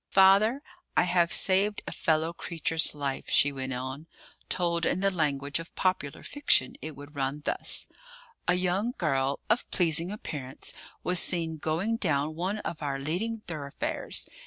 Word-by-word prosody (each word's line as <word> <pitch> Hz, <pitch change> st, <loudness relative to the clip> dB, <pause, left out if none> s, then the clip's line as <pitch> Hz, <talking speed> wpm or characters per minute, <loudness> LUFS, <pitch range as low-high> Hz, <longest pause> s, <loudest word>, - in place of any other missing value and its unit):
"Father, 200 Hz, +8 st, +5 dB, 0.3 s
I -, -, +6 dB
have 175 Hz, -1 st, +3 dB
saved 195 Hz, +2 st, +3 dB
a -, -, -5 dB
fellow 160 Hz, 0 st, +1 dB
creature's 165 Hz, -2 st, 0 dB
life," 140 Hz, -2 st, -3 dB
she 145 Hz, -, +4 dB
went 135 Hz, -1 st, -4 dB
on. 130 Hz, +5 st, -5 dB, 0.4 s
"Told 170 Hz, -2 st, 0 dB
in 185 Hz, -, +1 dB
the 195 Hz, 0 st, +3 dB
language 145 Hz, -4 st, 0 dB
of 165 Hz, -, -9 dB
popular 185 Hz, -7 st, -1 dB
fiction 290 Hz, -, +3 dB
it 155 Hz, -1 st, -6 dB
would 145 Hz, +2 st, -12 dB
run 140 Hz, +2 st, -2 dB
thus: -, -, 0 dB, 0.6 s
'A 175 Hz, -, +4 dB
young 185 Hz, +6 st, 0 dB
girl 135 Hz, -4 st, +1 dB
of 245 Hz, -, +1 dB
pleasing 170 Hz, -1 st, +2 dB
appearance 140 Hz, -10 st, -5 dB, 0.3 s
was 180 Hz, 0 st, +2 dB
seen 165 Hz, -3 st, 0 dB
going 170 Hz, +9 st, -1 dB
down 150 Hz, -6 st, 0 dB
one 185 Hz, +6 st, -2 dB
of 165 Hz, -, -5 dB
our 140 Hz, -2 st, -2 dB
leading 185 Hz, +11 st, -2 dB
thoroughfares. 150 Hz, -7 st, -4 dB
165 Hz, 155 wpm, -28 LUFS, 145-185 Hz, 0.6 s, I